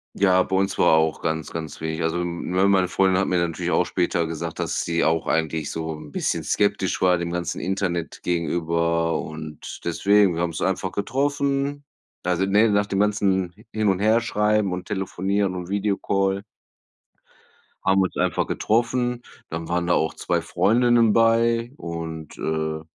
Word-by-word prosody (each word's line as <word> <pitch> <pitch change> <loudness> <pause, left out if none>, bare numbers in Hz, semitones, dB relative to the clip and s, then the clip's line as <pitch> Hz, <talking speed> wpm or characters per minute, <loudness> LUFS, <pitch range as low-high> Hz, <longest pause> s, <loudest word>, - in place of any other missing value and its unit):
Ja, 95 -2 +4
bei 95 - -1
uns 95 0 0
war 85 - +4
auch 80 0 0
ganz 80 0 -2
ganz 80 -1 -6
wenig. 80 +1 -3
Also, 80 +1 0
ne, 90 +2 0
meine 95 -2 +4
Freundin 95 0 +2
hat 95 - +1
mir 90 - +1
natürlich 85 -2 -1
auch - - +2
später 85 -1 0
gesagt, 80 0 -5
dass - - -1
sie 85 0 0
auch 80 0 +1
eigentlich 80 -2 -1
so 80 -1 -4
'n 75 -1 -11
bisschen - - -1
skeptisch 100 -2 0
war 90 -1 +4
dem 85 0 -3
ganzen 90 0 -3
Internet 95 -3 -2
gegenüber 85 -1 0
und 80 -1 -8
deswegen: 100 +1 +3
Wir 85 - -1
haben 85 - 0
uns 80 - -6
einfach 95 +1 -1
getroffen. 140 +4 -1 0.4
Also, 90 +1 +1
ne, 105 +4 +4
nach 105 -1 +2
dem 100 -1 -2
ganzen 95 -4 +1 0.2
hin 110 -1 0
und 95 -1 +1
her 110 +3 +4
schreiben 105 -3 +1
und 90 0 -6
telefonieren 95 0 -1
und 90 0 -6
Video-Call 100 -1 0 1.4
haben 95 +1 +4
wir - - +4
uns - - -11
einfach - - 0
getroffen. 120 +2 0 0.3
Dann 80 0 -5
waren 85 0 0
da 85 - +4
auch 80 - 0
2 - - -1
Freundinnen 120 0 +3
bei 115 +1 +3
und, 80 - -7
äh 80 0 -2
95 Hz, 170 wpm, -23 LUFS, 85-105 Hz, 1.4 s, Ja